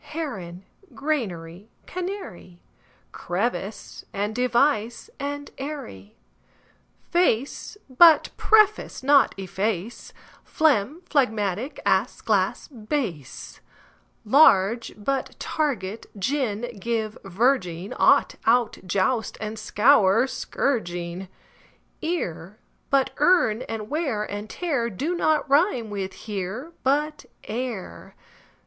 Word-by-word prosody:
Heron; 195 - -6 0.3
granary, 205 - -3 0.2
canary; 360 - -7 0.5
Crevice, 200 +2 -4
and 205 +2 -2
device, 240 -1 +1
and 285 +1 -5
eyrie; 265 - -7 0.9
Face 345 - 0
but 310 +5 +6
preface, 430 -1 +3
but 280 +1 +4
efface, 195 +2 -3 0.3
Phlegm, 300 - +1
phlegmatic; 220 - 0
ass, - - +1
glass, - - 0
bass; 220 - -5 0.7
Large, 230 -3 +5
but 265 +6 -2
target, 230 -9 -2
gin, 240 -1 -2
give, 220 0 -2
verging; 195 -3 0
Ought, - - +3
out, 235 -1 +3
joust 195 +5 0
and 215 0 -5
scour, 215 -1 +4
but 260 - -1
scourging; 175 -7 -2 0.7
Ear, 205 - -3 0.3
but 275 -1 +2
earn; 295 -9 +3
and 220 -2 -4
wear 280 -7 -1
and 205 +1 -6
tear 280 -10 -1
Do 275 - -2
not 315 -3 +1
rime 275 - +2
with 195 -2 -4
"here", 210 - -4
but 300 +3 0 0.2
"ere". 220 - -6
230 Hz, 95 wpm, -24 LUFS, 195-285 Hz, 0.9 s, but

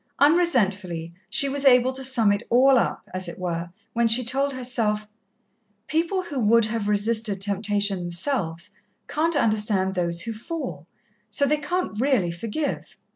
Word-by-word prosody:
Unresentfully, 205 - +2 0.2
she 275 +6 +2
was 280 +1 -2
able 255 -1 +5
to 265 +1 -5
sum 240 -5 +3
it 205 - 0
all 260 +2 +5
up, - - -2
as 185 0 -3
it 170 - -7
were, 175 -1 -3 0.2
when 235 0 +2
she 230 +3 +5
told 275 +4 0
herself, 230 -5 -1 0.8
"People 335 +6 -1
who 290 -6 -5
would 230 0 +4
have 220 -1 -3
resisted 210 0 +1
temptation 205 0 0
themselves, 175 - -2 0.4
can't 325 +2 0
understand 210 -6 +1
those 170 -2 -1
who 230 - -4
fall 215 - -6 0.4
so 250 +7 +1
they 300 +2 +2
can't 295 -7 -3
really 250 -11 +2
forgive. 230 - -4
225 Hz, 150 wpm, -24 LUFS, 195-270 Hz, 0.8 s, able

